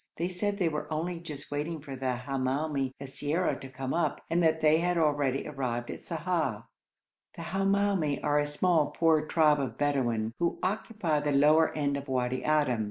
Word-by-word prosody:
They 170 +2 -2
said 200 +3 -2
they 180 -4 +1
were 150 0 -3
only 165 +3 -2
just 150 -4 -7
waiting 155 +3 -3
for 140 -2 -8
the 130 -1 -1
Hamoumi 135 +1 -1
siyara 145 +5 -1
to 135 - -8
come 130 0 -4
up, 160 -4 0
and 170 +1 +3
that 160 -1 +3
they 155 0 +4
had 175 +1 +1
already 145 -4 +1
arrived 125 -5 -3
at - - -8
Sa'ah. 160 - -2 0.7
The 170 - -7
Hamoumi 195 -4 +1
are 150 0 +2
a 145 - +1
small, 155 +1 +2
poor 160 -2 +3
tribe 155 -3 +4
of 130 -3 -3
Bedouin, 120 -6 0
who 170 -1 0
occupy 195 -5 -1
the 145 0 -1
lower 150 +3 +5
end 140 -1 0
of 140 +1 -7
Wadi 125 -1 -1
Adim. 145 -6 +2
150 Hz, 180 wpm, -29 LUFS, 135-170 Hz, 0.7 s, lower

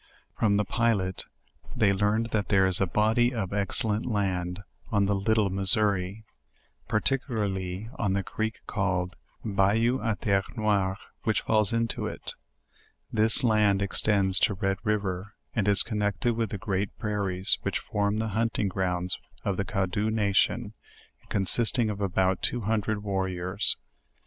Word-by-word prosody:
From 100 -2 +2
tke 105 -2 0
pilot 100 -6 0 0.5
they 100 -3 +3
learned 105 +3 0
that 105 -2 0
there 95 -2 +4
is 95 0 +1
a 95 - +2
body 110 +6 +2
of 100 -4 -3
excellent 105 +2 +1
land 95 -4 -1 0.3
on 100 -2 +3
the 100 - +1
little 100 0 +1
Missouri, 100 +1 +1 0.6
particularly 105 -6 -1
on 95 - +1
the 100 0 0
creek 110 +3 -4
called 90 -2 -1 0.3
the 115 - -4
"Bayou 110 +6 +2
a 110 -1 0
ter 100 -2 +1
re 95 - -15
noire," 100 -3 +1 0.2
which 110 - 0
falls 110 -3 +2
into 115 0 -1
it. - - -6 0.8
This 110 +3 +4
land 105 -4 +3
extends 100 -1 +3
to 100 - +2
Red 95 0 -1
riv 105 -2 0
er, 95 +2 -4 0.2
and 105 -4 0
is 100 -1 +6
connected 105 +1 -1
with 115 -2 -1
the 100 - -4
great 100 -2 -3
prairies 100 -4 0
which - - -1
form 100 0 -1
the 110 0 -1
hunting 110 -1 0
grounds 90 -1 -1 0.3
of 100 - 0
the 100 - -2
Cadaux 95 +2 -1
nation, 110 +1 +1 0.6
consisting 110 +3 +2
of 105 0 -6
about 95 -1 +1
two 120 - 0
hundred 105 -1 -1
warriors. 95 -1 -1
100 Hz, 150 wpm, -27 LUFS, 95-110 Hz, 0.8 s, is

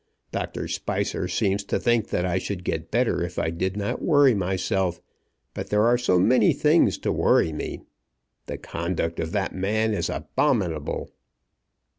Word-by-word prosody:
Doctor - - -4
Spicer - - -2
seems 100 +2 0
to - - 0
think 120 -3 +1
that 90 - 0
I 90 +1 0
should 90 -1 -5
get 80 -1 -3
better 120 -3 +1
if 85 0 -6
I 80 - 0
did 95 +4 -2
not 100 0 -2
worry 145 -5 +5
myself; 95 -2 -1 0.5
but - - -6
there 105 0 +3
are 120 +1 +5
so 120 -7 +2
many 120 +8 +4
things 155 +3 +3
to - - -2
worry 80 - +3
me. 75 - -5 0.7
The - - -4
conduct 85 -1 -3
of 80 - -2
that 100 -2 -1
man 110 +4 0
is - - -1
abominable." 80 -4 -1
95 Hz, 160 wpm, -25 LUFS, 85-110 Hz, 0.7 s, worry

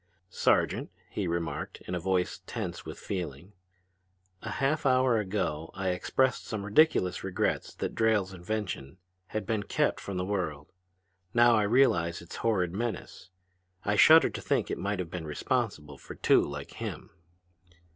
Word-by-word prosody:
"Sergeant," - - +2 0.2
he 100 -3 -2
remarked 85 0 -3
in 90 - -6
a 90 - -1
voice 90 0 0
tense - - -5
with - - -7
feeling, 90 -1 -5 0.9
"a - - -5
half 145 +3 0
hour 130 -3 +4
ago 90 -6 -2
I 95 -1 -1
expressed 125 +8 0
some 105 -3 -4
ridiculous 105 - +3
regrets 95 -1 -1
that - - -3
Drayle's 105 -4 +2
invention 90 -5 -4 0.3
had 110 - -3
been 110 -2 0
kept 100 - 0
from 100 -2 -5
the 90 - -1
world. 85 -7 -3 0.6
Now 120 0 +6
I 110 - +3
realize 100 -7 +3
its 85 0 -9
horrid 90 -7 +1
menace. 105 -4 -4 0.6
I 105 - +2
shudder 160 +8 +7
to - - -6
think - - 0
it - - -3
might 100 +1 -1
have 90 -2 -4
been 85 -2 -5
responsible 75 - -2
for - - -10
two - - +4
like 70 0 -5
him!" - - -6
95 Hz, 155 wpm, -29 LUFS, 85-110 Hz, 0.9 s, shudder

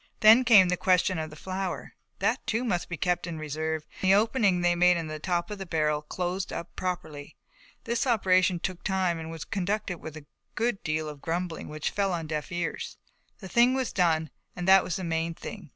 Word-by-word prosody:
Then 225 +3 +8
came 205 -7 +7
the 180 - +1
question 185 -1 +2
of 155 0 -4
the 155 - -11
flour, 185 +3 -4 0.2
that - - 0
too 230 +3 0
must 185 -8 -1
be 170 - -4
kept 180 +2 0
in 165 -2 -5
reserve 155 +1 -3 0.2
and 190 - +2
the 195 - +7
opening 210 -4 +2
they 175 - +3
had 175 - -1
made 180 0 +5
in 165 - -3
the 155 0 -6
top 175 +3 -1
of 205 - -5
the 195 - -5
barrel 150 -3 0
closed 180 +4 -3
up 170 - -6
properly. 155 -6 -5 0.5
This 235 +2 -1
operation 185 -6 +3
took 185 0 -4
time 185 -4 0
and 160 0 -6
was 165 -2 -7
conducted 195 -2 -2
with 160 0 -8
a 150 - -11 0.3
good 230 -2 0
deal 155 0 -2
of 150 -2 -8
grumbling 170 0 -3
which 155 0 -3
fell 195 -2 0
on 165 -2 -3
deaf 155 +1 -4
ears. 175 -1 -4 0.4
The 190 - -7
thing 240 +6 +4
was 260 -2 -2
done 160 -4 +1 0.2
and 180 0 -4
that 190 0 +7
was 175 - -3
the 190 - -4
main 165 0 -1
thing. 195 -4 -9
180 Hz, 215 wpm, -27 LUFS, 160-195 Hz, 0.5 s, Then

